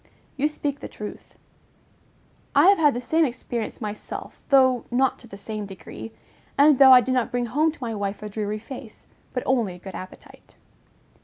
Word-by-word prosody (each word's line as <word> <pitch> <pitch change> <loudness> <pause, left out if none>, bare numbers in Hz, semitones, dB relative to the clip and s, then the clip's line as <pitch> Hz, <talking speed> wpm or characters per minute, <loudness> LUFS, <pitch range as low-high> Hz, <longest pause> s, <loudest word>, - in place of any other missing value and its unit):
You 285 +2 +1
speak 290 -2 -4
the - - -7
truth. 210 -1 -9 1.2
I 375 - +7
have 400 - +5
had 295 -4 +4
the 245 - -3
same 320 +6 +2
experience 240 -4 -3
myself, 210 -2 -7
though 260 -3 +5
not 260 +2 +1
to 235 - -15
the 200 - -10
same 210 0 -5
degree, 115 - -9 0.5
and 285 -1 +6
though 270 -1 +9
I 250 -1 +9
did 255 - -1
not 250 -2 +1
bring 245 0 -1
home 300 +7 +1
to 300 -4 -11
my 230 -2 -3
wife 200 0 -4
a 210 - -5
dreary 210 0 -3
face, 230 +1 -10 0.3
but 250 - -3
only 235 -8 +1
a - - -11
good 190 +1 -10
appetite. 185 0 -11
245 Hz, 185 wpm, -24 LUFS, 210-275 Hz, 1.2 s, though